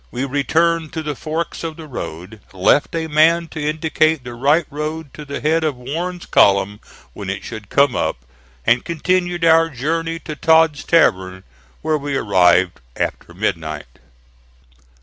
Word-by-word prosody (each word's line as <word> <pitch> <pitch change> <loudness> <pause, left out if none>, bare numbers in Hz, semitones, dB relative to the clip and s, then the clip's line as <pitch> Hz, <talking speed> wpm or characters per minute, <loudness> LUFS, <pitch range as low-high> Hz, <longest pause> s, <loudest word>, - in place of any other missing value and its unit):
We 130 +2 -3
returned 160 +4 0
to 160 - -4
the 150 -1 -3
forks 160 +5 -4
of 160 -1 -5
the 160 - -9
road, 105 - -8
left 95 - +2
a 165 -1 -1
man 160 +2 +3
to 160 - -6
indicate 155 -1 +1
the 120 -1 -7
right 145 +7 +2
road 150 0 -5
to 150 - -9
the 140 0 -5
head 160 +2 +1
of 155 -3 0
Warren's 170 +8 -5
column 100 +1 +3 0.3
when - - -7
it - - -4
should 105 -2 -8
come 140 -2 +3
up, - - -2 0.4
and 120 - +3
continued 175 +1 0
our 165 0 +5
journey 165 +5 -2
to 155 - -6
Todd's 160 -1 +3
Tavern, 95 - +2 0.4
where 155 -1 +1
we 140 -1 -2
arrived 90 -4 +3
after - - -3
midnight. 75 -5 -4
150 Hz, 155 wpm, -19 LUFS, 120-165 Hz, 0.4 s, our